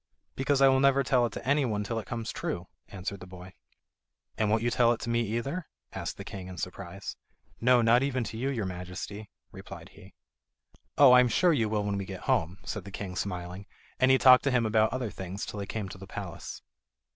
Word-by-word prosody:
"Because 135 +1 +1
I - - +8
will 130 0 +4
never 140 0 +4
tell 125 -2 +3
it - - -11
to - - -7
anyone 130 -8 +1
till 115 +2 -2
it 110 - -9
comes 115 -2 -4
true," - - -4 0.2
answered 100 +1 -6
the 95 - -10
boy. 90 0 -11 0.8
"And 110 -1 0
won't 110 +1 +2
you 120 - +1
tell 120 -1 +4
it 115 - -6
to 115 - -3
me 120 0 +2 0.2
either?" 155 +8 -4 0.3
asked - - -5
the - - -7
king 95 -2 -8
in 90 -1 -9
surprise. 95 +2 -6 0.4
"No, 125 0 +4
not 115 +2 +5
even 135 -3 0
to 110 - -6
you, 130 +4 -1
your 115 -7 -2
Majesty," 90 +3 -6 0.2
replied - - -10
he. - - -17 0.8
"Oh, 140 -3 +8
I 125 - +9
am 125 - +5
sure 175 +8 +4
you 115 -7 +1
will 105 -1 0
when 100 -1 -1
we 100 - -4
get 95 -1 -7
home," 85 +3 0
said 105 - -5
the 100 - -9
king 95 -1 -6
smiling, 90 0 -5 0.3
and 130 - +4
he 130 - +6
talked 130 -1 +7
to - - +3
him 125 -2 +2
about 110 0 +3
other 125 -4 -3
things 95 +1 -6
till 105 - -6
they 100 - -4
came 105 -2 -4
to 95 - -10
the 95 - -10
palace. - - -7
110 Hz, 225 wpm, -29 LUFS, 95-125 Hz, 0.8 s, I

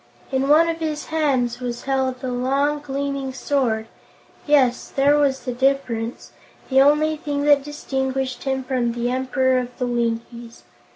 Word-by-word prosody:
In 265 +1 0
one 315 +3 +6
of 330 0 -2
his 310 -2 -3
hands 265 -7 +1
was 240 -1 -5
held 265 -1 -1
a 255 - -2
long, 275 +4 0
gleaming 275 -1 -3
sword. 255 -5 0 0.6
Yes, 265 -4 +3
there 280 +2 +3
was 280 -2 +2
the 250 - -4
difference, 245 -3 -1 0.4
the 265 0 +6
only 300 +2 +3
thing 290 -3 -3
that 290 -1 +4
distinguished 265 -3 -3
him 265 -1 -1
from 250 -2 -1
the 240 +1 -1
Emperor 260 0 +1
of 245 0 -6
the 250 - -1
Winkies. 235 0 -3
265 Hz, 155 wpm, -22 LUFS, 250-285 Hz, 0.6 s, one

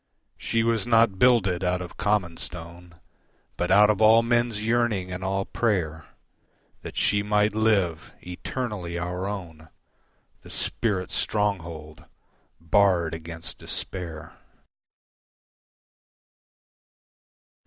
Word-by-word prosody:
She 115 0 0
was 115 -1 0
not 115 -5 +3
builded 100 -8 +3
out 90 0 +1
of 90 -1 -8
common 100 -5 0
stone 85 0 -9 0.6
But 90 - -2
out 105 +1 +6
of 105 - -2
all 110 +1 +6
men's 120 -2 0
yearning 115 -6 0
and 90 0 -5
all 95 +1 -1
prayer 80 -9 -1 0.8
That - - -9
she 100 0 +2
might 105 0 +1
live, 100 -7 +1
eternally 90 -1 -5
our 90 +2 -3
own, 85 -6 -7 0.7
The - - -14
Spirit's 95 -5 -2
stronghold 85 -7 -2 0.5
barred 85 -1 +2
against 80 +1 -6
despair. 85 -5 -5
95 Hz, 100 wpm, -25 LUFS, 85-110 Hz, 0.8 s, out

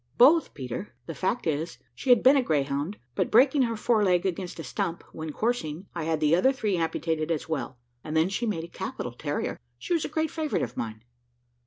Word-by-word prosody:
"Both, 310 +7 +6
Peter: 130 - -6
the 165 - -5
fact 190 - -1
is, 160 +1 -1 0.2
she 270 - -6
had 245 -3 +6
been 265 +3 +7
a 275 - +5
greyhound, 145 - -1 0.2
but - - 0
breaking 265 +5 +5
her 230 -3 +1
fore 215 0 +2
leg 180 -2 +3
against 185 -1 -3
a - - -4
stump, 170 +4 -3
when 160 -1 -5
coursing, 185 -5 -2
I 170 -3 -3
had 160 -1 0
the 155 +1 +4
other 225 +10 +4
three 215 -7 -1
amputated 160 -1 -1
as 160 -3 -1
well, 130 -5 -3 0.3
and 155 +1 -2
then 160 +2 +4
she 230 +4 -1
made 175 -7 -1
a - - -7
capital 125 -6 -5
terrier. 145 +4 -3 0.2
She 350 - -3
was 330 - +1
a - - -3
great 315 -1 -1
favourite 310 -2 -1
of 120 - -5
mine." 110 -1 -5
170 Hz, 215 wpm, -27 LUFS, 155-235 Hz, 0.3 s, been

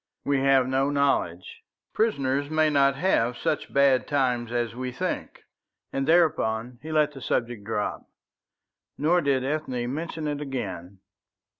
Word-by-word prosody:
We 140 -1 +2
have 135 -1 +4
no 135 +1 +1
knowledge. 140 -12 0 0.3
Prisoners 140 -10 0
may 155 0 +2
not 140 -1 +3
have 130 -7 +1
such 160 -2 -2
bad 140 -2 +3
times 125 -5 0
as 120 -1 -1
we 125 +1 -4
think;" 125 - -4 0.5
and 135 0 -1
thereupon 125 -8 +2
he 160 +3 -7
let 150 -1 +2
the 135 -2 -11
subject 120 -3 -2
drop. 105 -1 -3 0.9
Nor 175 +4 +3
did 140 -3 +1
Ethne 130 -4 -2
mention 160 0 -4
it 145 0 -3
again. 100 -9 -5
135 Hz, 140 wpm, -26 LUFS, 120-150 Hz, 0.9 s, have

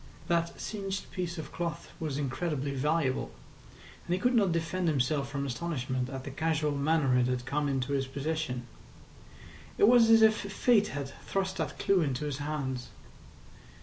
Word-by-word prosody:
That 170 -1 0
singed 195 -2 -4
piece 175 -2 -3
of 160 - -6
cloth 170 -3 -4
was 150 -4 -2
incredibly 145 0 -2
valuable, 140 0 0 0.8
and 175 - +2
he - - -3
could 250 +4 +2
not 205 -6 +4
defend 170 +2 -1
himself 140 -1 +1
from 140 0 -3
astonishment 130 -2 -2
at 135 -1 -6
the 135 - -6
casual 155 +1 0
manner 145 -2 +2
it 125 - +3
had 125 -1 -1
come 145 +2 0
into 135 0 -1
his 135 -1 0
possession. 140 -2 -3 1.1
It 205 - +6
was 235 -1 +6
as 225 0 +7
if 220 0 +6
Fate 210 +1 +2
had 140 -1 -4 0.2
thrust 190 -1 -1
that - - -3
clue 195 -2 +3
into 145 -1 -1
his 145 -2 -3
hands. 135 -4 -3
150 Hz, 165 wpm, -30 LUFS, 135-175 Hz, 1.1 s, as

